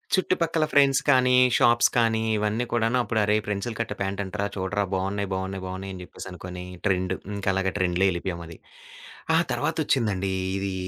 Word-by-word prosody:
చుట్టుపక్కల 170 -4 +1
ఫ్రెండ్స్ 135 -1 +4
కానీ, 125 -2 +5 0.2
షాప్స్ 120 0 +5
కానీ 115 -1 +3 0.2
ఇవన్నీ 105 +3 0
కూడాను 120 +1 +1
అప్పుడు 110 0 -1
అరేయ్! 105 +1 +2
పెన్సిల్ 105 +3 -3
కట్ 115 -2 -2
ప్యాంట్ 100 +1 -2
అంటరాా 100 +1 -3
చూడరా 100 +1 -1
బావున్నాయి 95 +1 -1
బావున్నాయి 95 0 -4
బావున్నాయి 95 +1 -6
అని 90 - -8
జెప్పేసనుకోని 90 0 -8 0.2
ట్రెండు. 95 -1 0 0.2
ఇంక 100 -1 -5
అలాగా 95 0 0
ట్రెండ్‌లో 90 0 +1
ఎళ్ళిపోయామది. 85 -2 -5 0.8
ఆ - - +5
తర్వాతొచ్చిందండి 95 -3 0 0.2
ఇది 95 0 -2
100 Hz, 150 wpm, -25 LUFS, 95-115 Hz, 0.8 s, కానీ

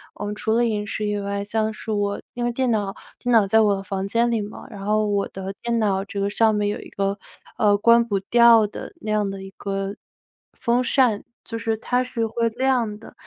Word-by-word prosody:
我 - - -5
们 205 - -3
除 220 +1 -1
了 235 +1 +3
饮 210 -2 -1
食 210 +1 -3
以 205 0 -1
外， 200 0 -3
像 220 +1 -1
是 220 +1 -6
我 205 -1 0 0.2
因 240 - -3
为 240 - +1
电 255 +1 0
脑 205 -2 -1 0.2
电 245 - -1
脑 220 -3 +6
在 220 +3 +4
我 200 -2 +2
房 195 0 -3
间 235 +3 +2
里 225 -2 +1
嘛， 205 - -9
然 200 -3 -9
后 215 0 +2
我 200 -1 0
的 190 0 -6
电 235 0 0
脑 195 -3 +1
这 200 - -5
个 200 0 0
上 220 0 +3
面 205 0 +1
有 205 - -3
一 - - -11
个， 195 0 -2 0.4
呃， 205 -1 +4
关 235 +3 +5
不 205 -4 -1
掉 230 +1 +6
的 210 - -7
那 215 - -3
样 210 -2 +1
的 195 0 -6
一 195 - -9
个 200 - -5
风 195 0 -2
扇， 200 - -8 1.5
就 230 - -5
是 225 -1 -1
它 245 +3 0
是 245 -2 -2
会 230 +1 0
亮 240 -3 0
的， - - -13
210 Hz, 250 characters per minute, -23 LUFS, 200-230 Hz, 1.5 s, 脑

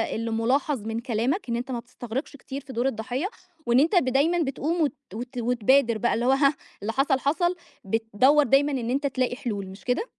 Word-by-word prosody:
اللي 230 +1 -3
مُلاحَظ 255 +4 +1
من 225 +1 -2
كلامك، 245 - -1
إن 235 - 0
أنت 250 +3 -4
ما 240 - -2
بتستغرِقش 250 +3 -6
كتير 275 0 -7
في 265 -1 -10
دور 240 +3 0
الضحيّة 250 - -2 0.4
وإن 240 +1 +4
أنت 320 +7 +3
ب 350 - +4
دايمًا 285 +7 +2
بتقوم 310 +4 -1
وت 295 - +2 0.2
وت 245 +3 -7
وتبادر 240 0 +3
بقى، 240 - +1
اللي 235 - 0
هو 260 - +4
هاه، 275 +1 +4 0.3
اللي 215 +3 -2
حصَل، 270 +1 +2
حصَل، 345 +6 +1 0.3
بتدوّر 225 +8 +3
دايمًا 280 +1 +3
إن 245 -4 -2
أنت 280 +3 +1
تلاقي 255 -2 -1
حلول 205 -7 -4
مش 190 +1 -12
كده؟ 280 - 0
255 Hz, 205 wpm, -25 LUFS, 235-280 Hz, 0.4 s, وإن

